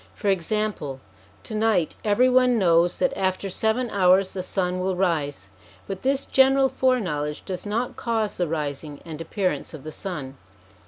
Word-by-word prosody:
For 200 - -1
example, 190 -6 -1 0.4
to - - -7
night 215 -6 +1
every 215 +4 +4
one 250 -1 +4
knows 175 -3 +3
that 270 0 +1
after 190 -1 -1
seven 225 +5 0
hours 190 0 +4
the 185 - -3
sun 185 -1 -1
will 185 0 -1
rise; 150 - -1 0.4
but 195 -1 -6
this 270 +1 0
general 270 0 +4
fore 255 -1 +2
knowledge 150 -6 -3
does 190 +1 -5
not 230 +4 -2
cause 225 -3 -1
the 175 - 0
rising 150 -1 -4
and 160 -1 -7
appearance 180 0 -2
of 145 - -11
the 155 - -7
sun. 145 -7 -6
190 Hz, 165 wpm, -24 LUFS, 165-220 Hz, 0.4 s, every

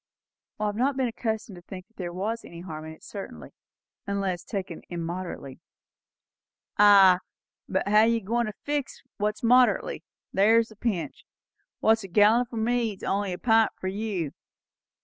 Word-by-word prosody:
"I 215 - 0
have 205 -1 -1
not 260 +4 +1
been 260 -2 +1
accustomed 220 -4 -4
to - - -11
think 185 +1 -9
there 175 -2 -5
was 215 +6 -3
any 170 0 -10
harm 155 -3 -7
in 160 - -8
it 160 - -18
certainly, 80 - -8 0.6
unless 195 -3 -2
taken 190 -5 -5
immoderately." 170 -5 -5 1.2
"Ay, 195 -3 +8 0.5
but 190 +1 -1
how're 210 +2 +5
you 230 0 +2
goin' 235 +3 -1
to 215 - -5
fix 290 -2 -3
what's 210 +1 -2
moderately? 250 +2 +3 0.3
there's 225 +3 +4
the 220 - -15
pinch. 205 -6 -3 0.6
What's 220 0 +3
a - - -7
gallon 210 +6 +4
for 235 - -8
me's 225 -2 -1
only 200 0 -1
a 180 - -4
pint 225 0 +3
for 185 - -2
you. 195 -6 -3
205 Hz, 155 wpm, -26 LUFS, 185-225 Hz, 1.2 s, Ay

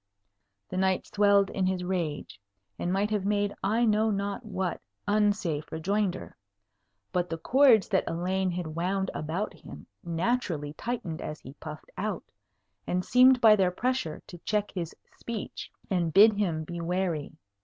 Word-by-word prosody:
The 185 - -5
knight 190 0 +1
swelled 200 -1 +3
in 190 -1 0
his 185 -1 -1
rage, 170 - -3 0.4
and 175 - -1
might 200 +3 0
have 210 -3 0
made 205 0 +1
I 220 +5 +2
know 215 0 +3
not 200 +2 -2
what 190 -4 -3 0.3
unsafe 205 -7 +1
rejoinder; 190 +3 -1 0.8
but 180 -1 0
the 165 - -3
cords 245 - +5
that 190 -3 +2
Elaine 185 +3 0
had 175 -3 -4
wound 190 +3 -1
about 165 +7 -3
him - - -12 0.2
naturally 170 -4 -1
tightened 185 -7 -4
as 150 - -5
he 130 - -10
puffed 150 +1 -10
out, 210 +3 -2 0.6
and 180 0 -1
seemed 255 +1 +6
by 220 -2 +8
their 190 -3 +3
pressure 240 -4 -2
to 175 - -11
check 210 +3 -1
his 170 -4 -5 0.2
speech 230 -3 -6 0.2
and 175 -4 0
bid 210 +5 +7
him 175 -6 -1
be 170 +2 -6
wary. 170 -3 -1
190 Hz, 155 wpm, -28 LUFS, 170-210 Hz, 0.8 s, by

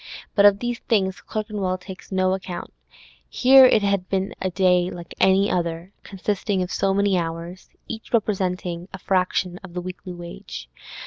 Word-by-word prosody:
But 200 - +5
of 200 -1 +4
these 240 +1 -3
things 190 -4 0
Clerkenwell 210 -4 -3
takes 185 +1 -11
no 185 0 +2
count; 180 -2 -7 0.6
here 260 0 +7
it 215 -4 +3
had 200 -2 0
been 195 0 -1
a 190 - 0
day 180 -1 +3
like 170 -2 -9
any 190 +1 +4
other, 170 +1 -2
consisting 195 0 -2
of 180 - -6
so 195 - +1
many 200 -1 +2
hours, 170 +2 -6 0.2
each 225 -1 -7
representing 185 -5 -1
a - - -5
fraction 185 -1 0
of 180 -2 -11
the 180 - -2
weekly 185 +1 -7
wage. 170 - -9
190 Hz, 165 wpm, -23 LUFS, 180-200 Hz, 0.6 s, here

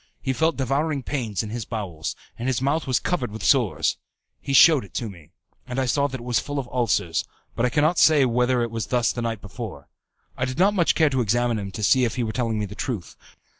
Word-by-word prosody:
He 130 - -1
felt 160 +4 +1
devouring 140 +2 0
pains 115 -9 -2
in 105 - -6
his 120 0 -3
bowels, 95 -9 -5 0.2
and 120 - -5
his 130 - 0
mouth 140 +4 0
was 130 -2 +2
covered 170 -9 -1
with 105 -1 -8
sores. 90 - +2 0.4
He - - -4
shewed 150 0 +7
it 100 - -5
me, 95 -9 -8 0.4
and 125 0 -5
I 130 - +1
saw 140 +3 +1
it 130 -2 -3
was 120 0 0
full 145 0 -5
of 135 -3 -3
ulcers, 115 -9 0 0.3
but 120 - +2
I - - -1
cannot 155 +5 +2
say 150 -4 +6
whether 125 0 +2
it 115 - -3
was 115 -3 -3
thus 120 -1 +1
the 120 - -4
night 115 -3 -3
before. 100 - -8 0.5
I 130 - -1
did 130 +1 -5
not 195 +4 +4
much 175 -5 +2
care 155 -3 +3
to 130 -2 +1
examine 120 +1 +1
him 100 -1 -5
to 105 - -5
see 130 +5 +4
if 115 -3 0
he 125 - -1
were 110 - -2
telling 115 -3 -1
me 105 - -1
the 100 - -9
truth. 105 - -5
125 Hz, 240 wpm, -24 LUFS, 110-135 Hz, 0.5 s, shewed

